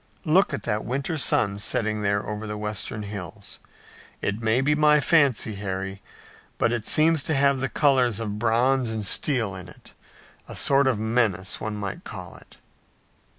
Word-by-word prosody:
Look 175 +5 +3
at - - -4
that 105 -2 -2
winter 140 +7 -3
sun 100 -8 +1
setting 110 +1 0
there 100 0 0
over 105 +1 -5
the 105 0 -5
western 105 0 -3
hills. 100 -5 -8 0.6
It 100 +3 -3
may 110 +2 +2
be 140 +3 +2
my 150 0 +4
fancy, 140 -7 +2
Harry, 95 -1 -5 0.6
but - - +1
it 115 -3 -3
seems 160 0 +4
to 155 - -1
have 140 -1 +3
the 135 0 -2
colors 125 -7 +2
of 105 -2 -4
bronze 120 +2 +2
and 110 -2 -3
steel 115 -2 +1
in 90 -1 -8
it, - - -17 0.5
a - - -8
sort 140 0 +3
of 130 -5 +2
menace, 110 -4 -1
one 110 -1 -3
might 100 -2 -5
call - - -8
it." - - -19
110 Hz, 170 wpm, -24 LUFS, 105-135 Hz, 0.6 s, my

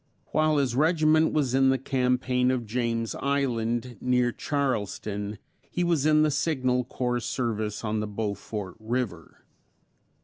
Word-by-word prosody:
While 155 -1 +3
his 135 -4 +1
regiment 155 +1 +4
was 140 -5 0
in 135 0 +4
the 130 - +3
campaign 125 -1 +1
of 130 -2 0
James 115 0 -1
Island, 120 -4 -1
near 125 -1 +2
Charleston, 105 -7 -2 0.3
he 175 - -1
was 165 -4 +2
in 155 0 +5
the 155 - +2
Signal 130 -4 +1
Corps 125 0 -1
service 110 -4 -2
on 110 0 -1
the 105 - -2
Beaufort 105 -2 -4
river. 110 -7 -4
125 Hz, 135 wpm, -27 LUFS, 110-140 Hz, 0.3 s, in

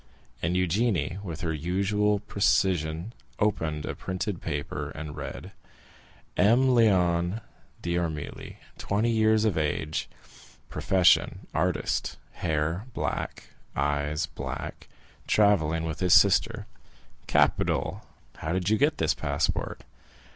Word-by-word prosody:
And 85 +3 0
Eugénie, 90 -1 +1
with 85 -5 -6
her 85 -2 -1
usual 100 +6 +1
precision, 95 -3 +1 0.2
opened 80 -8 0
a - - -3
printed 95 0 -4
paper, 70 -3 -3
and 75 -1 -6
read: - - -7 0.8
"M. 115 +8 +5
Léon 90 -5 +3 0.4
d'Armilly, 85 -4 -3 0.2
twenty 110 +4 +1
years 110 -1 +3
of 100 -7 +1
age; 75 +1 -2 0.6
profession, 90 -3 +3
artist; - - -1
hair 80 +6 -2
black, - - -3 0.3
eyes 75 +2 0
black; - - -6 0.4
travelling 80 -7 +3
with 80 -2 -4
his 90 -3 +5
sister." 100 +5 +4 0.6
"Capital! - - +1 0.3
How 80 +2 -3
did 95 +2 0
you 110 - +3
get 150 +3 +3
this 80 -2 +2
passport?" 75 -1 -2
90 Hz, 105 wpm, -27 LUFS, 80-105 Hz, 0.8 s, M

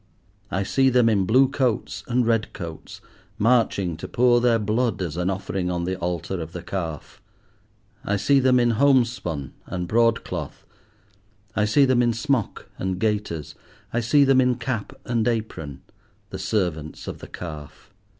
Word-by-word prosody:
I 95 +2 -1
see 135 +7 +3
them 125 -2 +4
in 100 -4 +2
blue 130 +4 +5
coats 125 -7 -1
and 125 0 +1
red 115 -2 0
coats, 85 -2 -8 0.4
marching 105 -6 +2
to - - -7
pour 120 0 +3
their 120 -1 +4
blood 115 +3 0
as 85 -5 -3
an 90 +1 -1
offering 95 -1 -2
on 85 -1 -2
the 95 +2 -1
altar 90 +1 -3
of 80 +1 -7
the 90 - -6
Calf. 85 -6 -5 0.8
I 100 - 0
see 135 +8 +3
them 130 -1 +4
in 120 -1 +3
homespun 120 - +1
and 90 -1 -4
broadcloth, 110 -8 0 0.9
I 105 - +2
see 140 +7 +4
them 130 -2 +3
in 120 -1 +2
smock 115 -1 -1
and 95 -1 -2
gaiters, 105 -7 -2 0.4
I 120 - +1
see 130 +5 +4
them 135 -1 +5
in 125 -1 +2
cap 120 -2 -3
and 115 -2 0
apron, 100 - -3 0.5
the 95 - -5
servants 90 -6 -2
of - - -6
the - - -10
Calf. 80 +3 -9
105 Hz, 160 wpm, -24 LUFS, 90-120 Hz, 0.9 s, blue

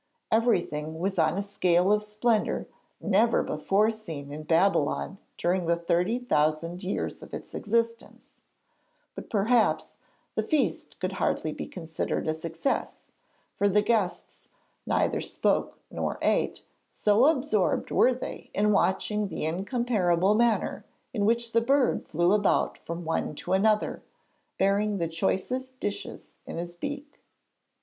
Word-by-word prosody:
Everything 170 -9 +1
was 190 +3 -1
on 155 +3 +2
a 200 - 0
scale 185 -1 +2
of 210 0 +1
splendour 210 +1 0 0.3
never 215 +3 +3
before 195 +8 +1
seen 160 -10 -8
in 150 +1 -6
Babylon 170 +2 +1 0.2
during 175 0 0
the 170 - +3
thirty 175 +6 +1
thousand 165 -4 0
years 185 - -3
of - - -8
its - - -9
existence; 230 +2 -2 0.7
but - - -9
perhaps 225 +2 +2 0.4
the - - 0
feast 305 -4 -1
could - - -2
hardly - - -1
be - - -6
considered 165 -3 -3
a 155 - +2
success, 165 - -3 0.5
for 205 - +2
the 205 +1 +3
guests 210 -5 -1 0.4
neither - - +1
spoke - - 0
nor - - -2
ate, - - +1 0.3
so 215 +6 +4
absorbed 260 - +1
were 255 - +5
they 255 - -7
in 210 +1 +3
watching 205 +1 +1
the 160 - -4
incomparable 190 0 +1
manner 230 0 +1 0.3
in 205 -4 0
which 235 +1 +1
the 230 - +3
bird 270 +2 +2
flew 175 +4 +2
about 205 -1 +2
from 170 +1 -6
one 160 -1 -1
to - - -3
another, 210 +2 +2 0.6
bearing 200 +2 +2
the 170 -2 -1
choicest 250 +10 -2
dishes 205 - -5 0.2
in - - -6
his 175 +1 -5
beak. 285 - -6
200 Hz, 135 wpm, -27 LUFS, 170-230 Hz, 0.7 s, were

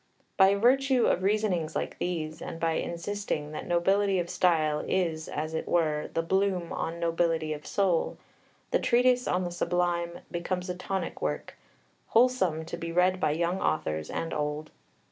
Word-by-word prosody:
By 195 0 +6
virtue 260 +3 +3
of 180 - +2
reasonings 190 -5 0
like - - -3
these, 160 -3 -3
and 165 - -6
by 165 -1 +1
insisting 170 -2 -3
that 155 - -6
nobility 195 +3 +2
of 175 -1 -2
style 155 -4 +2
is, 165 -4 0
as 155 +2 -3
it 160 - -3
were, 155 -3 +1
the 165 - +1
bloom 190 -1 0
on 165 +1 -3
nobility 165 -2 +1
of 150 0 -9
soul, 185 -4 +1 0.5
the - - +3
Treatise 250 +1 +3
on 180 +1 +1
the 175 - -3
Sublime 175 -1 -1
becomes 180 +1 -2
a - - -5
tonic 190 +1 -4
work, - - -3 0.5
wholesome 225 -10 +2
to 165 - -5
be 165 -1 -5
read 180 +2 +3
by 155 - +2
young 170 +4 -1
authors 80 - -1
and 165 - -3
old. 150 +1 -3
175 Hz, 165 wpm, -28 LUFS, 160-190 Hz, 0.5 s, By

